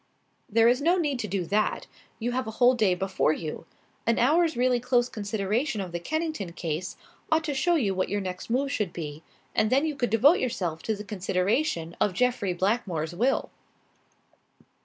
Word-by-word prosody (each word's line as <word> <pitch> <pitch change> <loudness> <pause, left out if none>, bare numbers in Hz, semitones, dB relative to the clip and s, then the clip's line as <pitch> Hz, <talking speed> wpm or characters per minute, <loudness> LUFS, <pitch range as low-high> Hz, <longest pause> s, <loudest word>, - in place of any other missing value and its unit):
"There 225 +1 +4
is 250 +3 +3
no 345 +5 +3
need 290 -7 0
to 215 - -2
do 190 -2 -2
that. 210 +5 0 0.3
You 240 +2 -2
have 255 0 -2
a 220 - -7
whole 250 0 +6
day 210 -7 +2
before 190 -4 +1
you. 160 0 -6 0.4
An 230 - +3
hour's 320 +4 +3
really 250 0 +3
close 245 0 +2
consideration 215 +3 -2
of 185 -3 -4
the 175 - -3
Kennington 310 - -3
case 170 +1 -4 0.3
ought 315 0 +3
to 300 -2 -2
show 345 +6 +2
you 215 -11 +1
what 185 0 -1
your 205 - 0
next 185 0 -5
move 275 +4 0
should 210 -10 -2
be, 150 -2 -6 0.3
and 215 - +2
then 275 +5 +3
you 305 -2 -2
could 245 -3 -1
devote 270 - +5
yourself 175 -10 -2
to 220 - -1
the 205 - -7
consideration 185 - -1
of 205 - +2
Jeffrey 245 -4 +1
Blackmore's 180 -4 -1
will." 245 +9 0
220 Hz, 185 wpm, -27 LUFS, 185-255 Hz, 0.4 s, whole